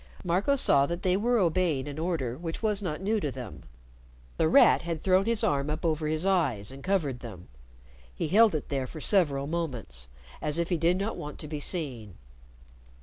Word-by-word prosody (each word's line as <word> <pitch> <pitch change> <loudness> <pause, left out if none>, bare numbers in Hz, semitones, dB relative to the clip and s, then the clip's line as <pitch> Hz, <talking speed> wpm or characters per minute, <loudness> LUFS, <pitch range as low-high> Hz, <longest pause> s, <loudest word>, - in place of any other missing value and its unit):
Marco 185 +10 +1
saw 140 - +4
that 170 +2 -4
they 185 -1 +2
were 235 +5 +2
obeying 170 -7 +1
an 145 +1 -6
order 160 -8 -2
which 165 - -6
was 210 -2 +1
not 170 -5 -4
new 215 +3 +1
to 150 - -2
them. 125 -6 -8 0.8
The 160 - +3
Rat 280 - +6
had 170 -1 -4
thrown 190 +3 +3
his 230 -1 0
arm 140 0 +1
up 155 +3 -3
over 155 -1 0
his 155 +3 -1
eyes 140 - +1
and 135 +1 -11
covered 160 -10 0
them. 105 -8 -10 0.6
He - - -4
held 215 +1 +5
it 155 - -4
there 135 -2 -2
for 155 - -9
several 145 -7 +2
moments, 125 - -4 0.3
as 150 +1 0
if 170 0 -1
he 175 - +1
did 170 +3 +2
not 200 +4 -3
want 150 0 -7
to 150 - -8
be 150 0 -5
seen. 130 - -4
160 Hz, 200 wpm, -28 LUFS, 140-185 Hz, 0.8 s, Rat